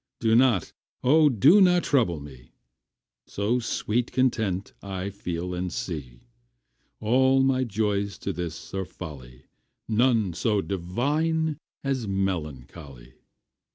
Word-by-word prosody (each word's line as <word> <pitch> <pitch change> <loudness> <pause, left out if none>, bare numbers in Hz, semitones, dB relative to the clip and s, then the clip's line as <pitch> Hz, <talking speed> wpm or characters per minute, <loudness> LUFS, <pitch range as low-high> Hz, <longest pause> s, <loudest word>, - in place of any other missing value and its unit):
Do 115 -1 +3
not, 120 -8 +3 0.3
O 150 +4 +5
do 145 - +6
not 180 -2 +5
trouble 110 - +1
me, 65 -3 -13 0.7
So 105 +5 0
sweet 120 0 -1
content 110 -7 0
I 95 0 -5
feel 90 -2 -4
and 90 0 -3
see. 70 -9 -6 0.8
All 130 +4 +3
my 130 -1 +2
joys 100 -3 -1
to 100 - -4
this 85 -1 -6
are 95 0 -1
folly, 65 -9 -10 0.4
None 115 -4 +2
so 105 +5 +1
divine 145 - -1 0.2
as 135 -5 -1
melancholy. 75 -8 -4
100 Hz, 115 wpm, -26 LUFS, 85-130 Hz, 0.8 s, do